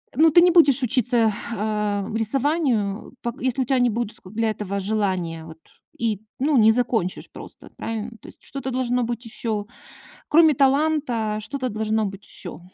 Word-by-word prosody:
ну 320 +2 +5
ты 345 - +7
не 355 0 +5
будешь 285 -6 +5
учиться, 240 -3 +2 0.2
а-а, 210 -2 -1
рисованию, 235 -3 0
пок 240 +2 -5
если 260 +1 0
у - - 0
тя 260 0 +1
не 245 -1 +3
будет 230 0 -4
ку 185 - -14
для 225 0 0
этого 200 -2 -3
желания, 185 -6 -2
вот, 160 0 -12 0.4
и, 220 -3 -1 0.2
ну, 290 +1 +2
не 220 -1 +6
закончишь 225 -6 -1
просто. - - -12
Правильно? 225 0 -4
То - - -13
есть - - -14
что-то 265 -1 -6
должно 250 -1 0
быть 235 +1 -4
еще. 220 -2 -3 0.6
Кроме 315 -1 +6
таланта, 270 -6 +1
что-то 260 +3 -4
должно 220 0 -1
быть 195 0 -8
еще. 175 -3 -8
230 Hz, 170 wpm, -23 LUFS, 210-260 Hz, 0.6 s, ты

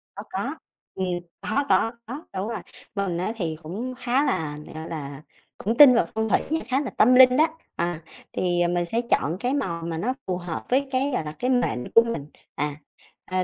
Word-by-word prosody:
Có, - - -6
có, - - -3 0.4
ừm, 190 -1 -1 0.3
có, 280 - 0
có, 225 - +4
có, 270 +8 -7
đúng 190 +3 -2
rồi, 230 - -3 0.4
mình 195 -4 -1
á 185 +5 -1
thì 170 -7 -2
cũng 215 +11 -4
khá 255 +2 +1
là, 150 - -1 0.2
gọi 160 +1 -6
là, 145 -3 -6 0.4
cũng 225 +4 -2
tin 275 -4 +10
vào 235 - +4
phong 220 0 0
thủy - - +4
nha, 320 +1 +1
khá 265 +2 +1
là 275 - -3
tâm 250 +4 +6
linh 255 0 +8
đó, 315 +2 +6 0.3
à, 170 -1 -2 0.3
thì 175 -1 +1
mình 175 0 0
sẽ 225 +7 0
chọn 160 +5 +2
cái 250 +4 0
màu 170 -12 -2
mà 165 -1 -3
nó 235 +10 0
phù 180 -1 0
hợp 175 -2 -5
với 275 +2 +2
cái, 270 +2 +1
gọi 205 - 0
là, 150 - -4
cái 250 - 0
mệnh 245 - 0
của 230 - +9
mình, 230 -12 -3 0.3
à, 145 0 -1 0.5
ờ, 185 0 0
200 Hz, 215 wpm, -25 LUFS, 170-255 Hz, 0.5 s, tin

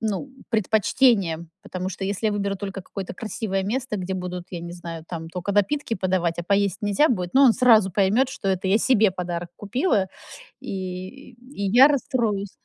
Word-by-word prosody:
ну, 220 +5 -2 0.2
предпочтения. 215 -5 +2 0.2
Потому 185 -2 -4
что 190 +1 -5
если 200 +3 -1
я 210 - +1
выберу 200 -1 -1
только 195 0 -6
какое-то 190 -1 -7
красивое 210 -3 -3
место, 240 +1 -2
где 190 0 -3
будут, 180 -1 -5
я 175 -2 -5
не 170 0 -7
знаю, 170 -2 -8
там 165 -2 -6
тока 180 +3 -4
напитки 225 +5 +1
подавать, 180 -3 0
а - - -1
поесть 200 -1 +1
нельзя 210 +9 +3
будет, 180 -5 -2
но 275 - +6
он 240 - +7
сразу 220 -6 +5
поймёт, 210 +7 +3
что 200 -6 -4
это 190 0 0
я 205 +3 +4
себе 220 -6 +4
подарок 175 -1 -4
купила, 215 - 0 0.5
и 190 +8 -6
и 240 -5 -5
я 260 +6 +8
расстроюсь 225 -8 -1
200 Hz, 180 wpm, -24 LUFS, 185-225 Hz, 0.5 s, я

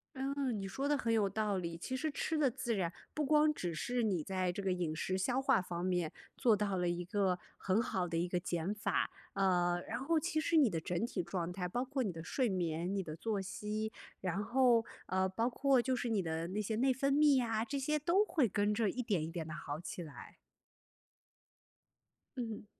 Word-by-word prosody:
嗯， 265 -3 -1
你 195 - -4
说 270 +8 -2
得 295 0 +3
很 235 -4 0
有 210 -3 +3
道 210 -1 0
理。 170 -2 -3
其 260 +10 -4
实 310 +4 -1
吃 315 +2 -1
得 290 -3 +4
自 240 -1 -2
然， 180 -4 0 0.2
不 300 - 0
光 300 +1 +5
只 175 - -3
是 245 +10 -1
你 190 -7 +1
在 185 0 0
这 200 +3 -5
个 190 - +1
饮 175 -4 -1
食 185 +4 -1
消 245 +7 +1
化 265 - +4
方 175 -1 -4
面 180 -4 0 0.2
做 230 -3 +4
到 200 -2 0
了 180 -1 +1
一 175 0 -2
个 190 -1 +1 0.2
很 195 +4 +2
好 185 -6 -1
的 165 -1 -2
一 170 +2 +1
个 180 0 0
减 175 +2 -2
法。 210 - 0 0.2
呃， 175 -3 +2
然 - - -3
后 315 +5 +2
其 315 0 -1
实 325 +1 +2
你 280 -6 +6
的 165 -4 -1
整 175 +6 -1
体 235 - -2
状 175 0 -3
态， 180 0 -3
包 240 +8 -1
括 270 +1 -2
你 205 - -1
的 165 -1 -7
睡 250 +6 0
眠、 175 -1 -1
你 195 - 0
的 155 -3 -6
作 210 +4 -1
息， 215 +3 -3 0.3
然 190 +2 -1
后， 240 0 +4 0.2
呃， 190 0 +2
包 225 +5 0
括 270 +1 +3
就 260 +1 0
是 245 -1 -2
你 215 -3 +2
的 165 0 -2
那 190 +4 -3
些 215 +1 -2
内 260 +3 +4
分 275 +2 +1
泌 290 -1 +6
呀， 225 -3 +1
这 280 +4 -3
些 300 +3 0
都 350 +7 +3
会 300 - +2
跟 205 +2 +1
着 210 -1 +2
一 250 - -2
点， 200 -9 0
一 - - -3
点 165 -2 -4
地 160 - -5
好 150 -2 -5
起 175 +1 -6
来。 155 -4 -10 2.0
嗯。 225 -4 -4
205 Hz, 240 characters per minute, -35 LUFS, 180-255 Hz, 2.0 s, 你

